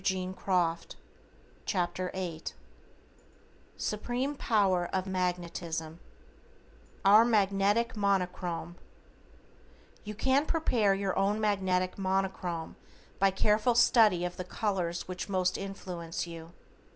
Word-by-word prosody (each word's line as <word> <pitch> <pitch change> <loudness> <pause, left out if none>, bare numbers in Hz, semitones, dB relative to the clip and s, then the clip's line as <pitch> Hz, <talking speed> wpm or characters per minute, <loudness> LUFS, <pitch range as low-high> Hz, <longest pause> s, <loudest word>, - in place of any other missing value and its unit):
=Lesson 185 -2 -1 1.2
Eighth= 170 -4 -4 1.2
=SUPREME 245 +6 -2
POWER 195 -8 +2
OF 185 -1 -1
MAGNETISM= 175 -3 -3 1.1
=OUR 210 +3 +8
MAGNETIC 210 +1 +2
MONOCHROME:= 180 -4 -1 1.3
You 210 0 -6
can 265 +6 +2
prepare 235 - +2
your 195 -1 -1
own 200 +2 +1
Magnetic 190 -3 0
Monochrome 190 -3 -2 0.4
by 195 - +5
careful 210 +5 +2
study 220 -7 +5
of 180 - -5
the 185 - -3
colors 180 -3 -2
which 185 +2 -5
most 185 -2 +1
influence 180 -4 -5
you. 165 -1 -9
190 Hz, 90 wpm, -30 LUFS, 180-210 Hz, 1.3 s, =OUR